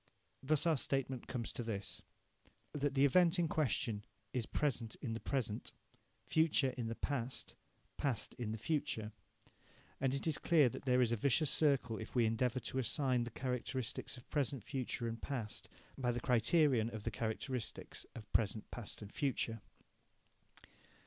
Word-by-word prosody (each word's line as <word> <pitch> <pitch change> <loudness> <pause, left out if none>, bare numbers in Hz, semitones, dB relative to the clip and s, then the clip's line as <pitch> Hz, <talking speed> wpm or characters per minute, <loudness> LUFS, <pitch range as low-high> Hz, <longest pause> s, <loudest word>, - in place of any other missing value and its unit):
Thus 150 +3 +2
our 165 -3 +4
statement 135 -1 -1
comes 120 -3 -3
to - - -3
this 110 -4 -3 0.7
that 145 -1 0
the 135 +1 +6
event 170 +5 +5
in 175 -1 +3
question 125 -8 0 0.3
is 120 -3 -1
present 120 -7 0
in 120 -6 -4
the 115 - -3
present, 115 -6 -2 0.5
future 155 -4 +3
in 120 -2 -4
the 115 - -3
past, 130 -2 -2 0.4
past 130 -7 0
in 115 -3 -2
the 110 - -2
future. 110 -4 -1 0.9
And 135 0 +1
it 140 - -3
is 160 -4 +1
clear 155 -7 +5
that - - -8
there 125 -1 +4
is 120 - +1
a - - +3
vicious 140 +5 +3
circle 135 -7 +3
if 110 - -8
we 120 -2 +5
endeavour 120 +3 +1
to 130 - -2
assign 130 -1 +2
the - - -5
characteristics 125 0 -3
of 125 - -14
present, 140 -5 0
future 125 -2 -2
and 115 0 -4
past 120 -7 -4 0.3
by 125 -2 0
the 120 - -1
criterion 125 0 +4
of 110 -3 -6
the 115 - -1
characteristics 115 +2 -3
of 115 - -6
present, 110 0 +1
past 115 -2 -5
and 100 - -10
future. 115 -5 0
125 Hz, 160 wpm, -37 LUFS, 115-140 Hz, 0.9 s, the